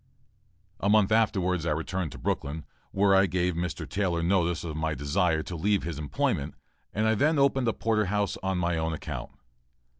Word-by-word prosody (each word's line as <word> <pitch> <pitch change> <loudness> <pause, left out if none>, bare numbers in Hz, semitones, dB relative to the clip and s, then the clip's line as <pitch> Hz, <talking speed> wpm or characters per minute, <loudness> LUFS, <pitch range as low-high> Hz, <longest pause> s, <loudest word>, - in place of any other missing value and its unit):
A 100 - 0
month 105 -1 +4
afterwards, 95 -6 +2
I 85 - -1
returned 80 +1 -3
to - - -9
Brooklyn, 75 +2 -3 0.2
where 100 0 +3
I 95 0 +5
gave 90 +1 0
Mr. 85 +1 -3
Taylor 90 -4 -1
notice 85 -2 +1
of 80 -3 -5
my 80 0 -1
desire 80 +3 +1
to 90 - -6
leave 100 +4 +1
his 80 -2 -4
employment; 75 -3 -1 0.4
and 110 +2 0
I 110 - +3
then 150 +8 +2
opened 135 -2 +3
a 115 - +2
porter 110 -2 +1
house 100 +1 0
on 95 -1 -1
my 85 -1 0
own 80 0 -1
account. 75 - -5
90 Hz, 185 wpm, -28 LUFS, 80-105 Hz, 0.4 s, I